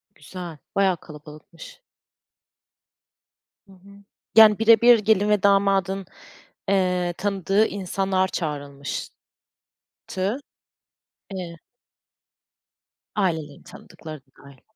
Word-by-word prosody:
Güzel, 165 +2 -9 0.2
bayağı 195 -2 +3
kalabalıkmış. 155 - -13 1.9
Hı 195 - -17
hı. 200 +2 -18 0.3
Yani 215 -2 +8
bire 225 -1 +5
bir 240 -1 +7
gelin 210 0 +2
ve 210 -2 +2
damadın, 195 -1 +2 0.6
eee, 180 -2 +1
tanıdığı 195 +1 +1
insanlar 190 -1 -1
çağırılmıştı, 145 -5 -6 2.0
eee 180 -3 -6 1.6
Ailelerin 160 -8 -2
tanıdıkları 155 -2 -11
da - - -51 0.2
dâhil. 140 -2 -16
190 Hz, 80 wpm, -23 LUFS, 160-200 Hz, 2.0 s, Yani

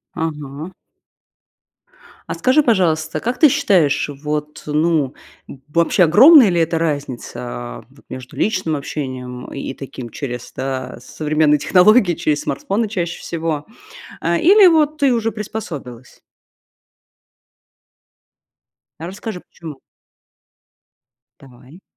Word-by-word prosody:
Ага. 155 0 -5 1.5
А - - -4
скажи, 260 +4 +3
пожалуйста, 165 - +1
как 245 +2 -3
ты 305 - +7
считаешь, 175 - +2
вот 150 +1 -5
ну, 150 -2 0 0.4
э, - - -7
вообще 170 +4 +2
огромная 240 - +8
ли 175 -2 +1
это 165 0 0
разница, 145 -6 -3
а, - - -7
вот - - -22
между 130 -1 -9
личным 185 -7 0
общением, 130 -3 -6
и, 140 - -5
э, - - -19
таким, 130 -3 -8
через, 125 0 -7
да, 130 -1 -4
современные 150 +1 +1
технологии, 190 - +4
через 150 -2 -1
смартфоны 200 +10 -2
чаще 175 -5 -4
всего, 160 -3 -4 0.5
а, 170 +1 0
или 390 - +6
вот 310 -3 +3
ты 275 -3 +3
уже 225 -1 -1
приспособилась? 165 - -8 2.8
Расскажи, 190 +4 -6
почему. 155 -5 -11 1.6
Давай. 135 +5 -17
160 Hz, 110 wpm, -19 LUFS, 140-195 Hz, 2.8 s, огромная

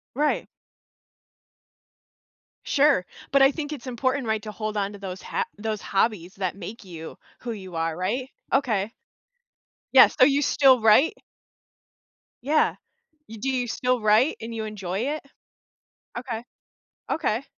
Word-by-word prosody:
Right. 300 +2 +1 2.2
Sure, 280 -10 +3 0.3
but 275 0 +5
I 270 - +7
think 305 0 -5
it's 265 -3 -7
important, 255 +1 -1
right, 220 -1 0
to 215 - -6
hold 215 +1 -4
on 200 +1 -2
to - - -9
those 190 -1 -6
ha - - -2
those 215 -1 -3
hobbies 195 -3 0
that 185 -1 -2
make 205 +5 -8
you 165 -4 -9 0.2
who 240 -2 -4
you 190 -5 -8
are, 165 0 -1
right? 230 +9 -2 0.2
Okay. 225 -6 +1 1.0
Yes, - - +8
so 255 - +8
you 285 0 +2
still 260 -3 +5
write? 225 +8 +5 1.3
Yeah, 305 +4 +2 0.5
you 225 -1 -9
do 270 - -1
you 250 -2 -1
still 250 +1 0
write 215 +7 +4
and 230 +1 -6
you 220 -1 -3
enjoy 195 -2 -4 0.2
it? - - -10 1.0
Okay. 240 -2 -5 0.7
Okay. 240 -4 0
225 Hz, 140 wpm, -25 LUFS, 200-260 Hz, 2.2 s, Yes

